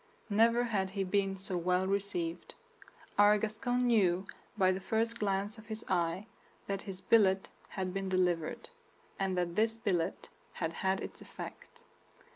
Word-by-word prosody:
Never 230 +3 +4
had 200 -5 0
he 195 0 -2
been 195 0 0
so 190 -1 -4
well 180 +2 +1
received. 190 -4 -2 0.6
Our 205 +1 +7
Gascon 230 +4 0
knew, 195 -6 +3 0.3
by 185 -2 +5
the 185 - -1
first 225 +4 -1
glance 200 +1 -1
of 220 - -14
his 220 0 -6
eye, 175 +2 0 0.4
that 195 -1 -2
his 190 -1 -7
billet 195 -4 +4 0.2
had 185 -2 -3
been 195 -1 -2
delivered, 180 - 0 0.5
and 190 -1 0
that 175 -1 0
this 225 +2 +2
billet 190 -7 -1 0.2
had 165 -1 -2
had 190 +3 0
its - - -7
effect. - - -10
195 Hz, 150 wpm, -33 LUFS, 185-215 Hz, 0.6 s, Our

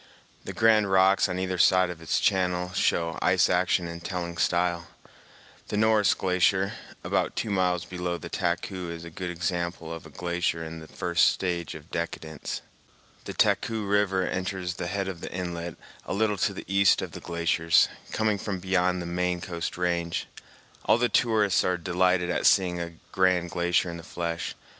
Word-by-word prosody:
The - - -4
grand 110 -2 +4
rocks 95 +1 +4
on 90 - -2
either 95 -1 -2
side 90 +1 +4
of 85 -2 -10
its 80 - 0
channel 90 -1 +1
show 85 -2 0
ice - - +3
action 90 - +2
in 85 0 -7
telling 85 -1 -4
style. 85 0 +1 0.8
The 105 - -2
Norris 110 -2 +4
Glacier, 95 +2 +2 0.3
about - - 0
two 110 - -2
miles 90 -3 +1
below 90 -1 -3
the - - -8
Taku 90 0 -2
is 85 0 -7
a 85 - -9
good 90 +2 -5
example 85 -1 -3
of 80 -1 -8
a - - -14
glacier 85 +1 -2
in 80 0 -7
the 80 - -11
first 85 0 +2
stage 85 -3 -1
of 80 +1 -12
decadence. 80 -2 -4 0.6
The - - -5
Taku 110 -2 +1
River 100 -2 +2
enters 90 -1 -3
the 85 - -5
head 95 +1 -2
of 90 -3 -6
the - - -6
inlet 85 -2 -4 0.3
a - - -2
little 105 0 +1
to 100 - +1
the - - -7
east 100 0 +4
of - - -6
the - - -9
glaciers, 85 -1 +2 0.2
coming 110 -2 +1
from 100 -1 -3
beyond 90 -1 +1
the - - -7
main 90 +1 -1
coast 85 -2 -4
range. 85 -1 -1 0.6
All - - +5
the 120 0 +1
tourists 105 -4 +3
are 90 -1 +1
delighted 90 +1 +1
at - - +2
seeing 90 -3 +3
a 85 -1 -6 0.2
grand 90 -2 +2
glacier 85 0 +1
in 85 - -7
the - - -8
flesh. 85 -1 -4
90 Hz, 180 wpm, -27 LUFS, 85-95 Hz, 0.8 s, All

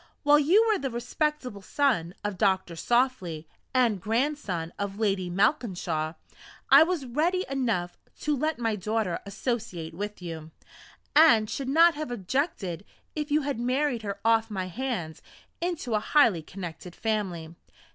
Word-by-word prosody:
While 295 0 +6
you 380 +10 +4
were 430 -3 +2
the 270 - -2
respectable 250 -1 -2
son 195 - 0
of 205 -3 -3
Doctor 190 -4 +1
Softly, 190 -7 0 0.2
and 235 -7 +2
grandson 220 - -1
of 200 0 -3
Lady 195 -4 0
Malkinshaw, 175 - 0 0.6
I - - +10
was 325 -4 +1
ready 330 +9 0
enough 230 -10 -1 0.2
to 300 -1 +1
let 305 +3 -1
my 225 -2 0
daughter 210 -2 -1
associate 200 -6 -4
with 205 +4 -5
you, 165 -3 -7 0.7
and 240 -9 +6
should 265 +4 -4
not 330 +4 +6
have 305 -3 -5
objected 205 - -2 0.3
if 300 -1 -3
you 300 +1 +2
had 275 -4 -2
married 255 0 0
her 200 -2 -5
off 225 0 +3
my 190 -3 -3
hands 215 -8 -4 0.4
into 335 -9 -2
a 215 - +3
highly 225 - +3
connected 175 0 -8
family. 190 -8 -2
225 Hz, 145 wpm, -27 LUFS, 185-280 Hz, 0.7 s, I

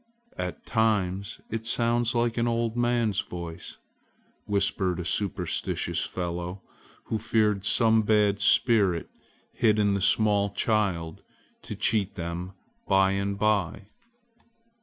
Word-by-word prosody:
"At 235 - -5
times 100 -4 0
it 115 0 -4
sounds 120 0 +2
like 120 -1 +1
an 115 - +1
old 115 -1 -1
man's 120 -4 +1
voice!" 85 -1 -7 0.7
whispered 95 -3 0
a 90 - -4
superstitious 100 +1 -1
fellow, 90 +1 -5 0.4
who 110 - -3
feared 105 -3 +1
some 110 0 +4
bad 105 -1 +2
spirit 100 -5 +2 0.4
hid 110 -3 +2
in 100 -1 +2
the 100 - -1
small 100 +1 +3
child 95 -6 -1 0.4
to 105 - -7
cheat 105 -1 0
them 85 +1 -5 0.3
by 95 0 +4
and 100 0 -2
by. 100 -1 0
105 Hz, 115 wpm, -26 LUFS, 95-110 Hz, 0.7 s, some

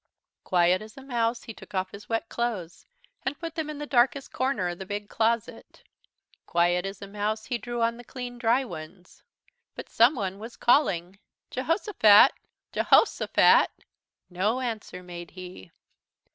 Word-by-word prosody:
Quiet 180 +1 +3
as 215 +3 -12
a 270 - -10
mouse 235 -3 -1
he 225 - -8
took 205 - -13
off 185 0 -1
his 200 +1 -12
wet 225 0 -1
clothes, 215 -9 -4 0.3
and 265 +2 -3
put 330 -2 -6
them 320 -2 -3
in 300 - -6
the 295 - -5
darkest 265 0 +1
corner 260 -9 0
of 175 - -6
the 190 - -6
big 205 +1 -5
closet. 230 0 -2 0.6
Quiet 175 +2 +2
as 195 0 -8
a - - -7
mouse 210 +2 -3
he 240 -1 -2
drew 240 -1 -3
on 230 0 0
the 240 - -11
clean 245 0 -7
dry 240 +3 +2
ones. 175 -1 -11 0.5
But - - -8
someone 220 -6 +2
was 225 +3 -9
calling: 190 - +2 0.3
"Jehosophat 265 - +5 0.4
Je - - 0
hos' - - +4
o - - -1
phat!" - - +5 0.6
No 200 +7 0
answer 220 -7 -5
made 175 -1 -9
he. 180 - -10
220 Hz, 165 wpm, -27 LUFS, 185-245 Hz, 0.6 s, Jehosophat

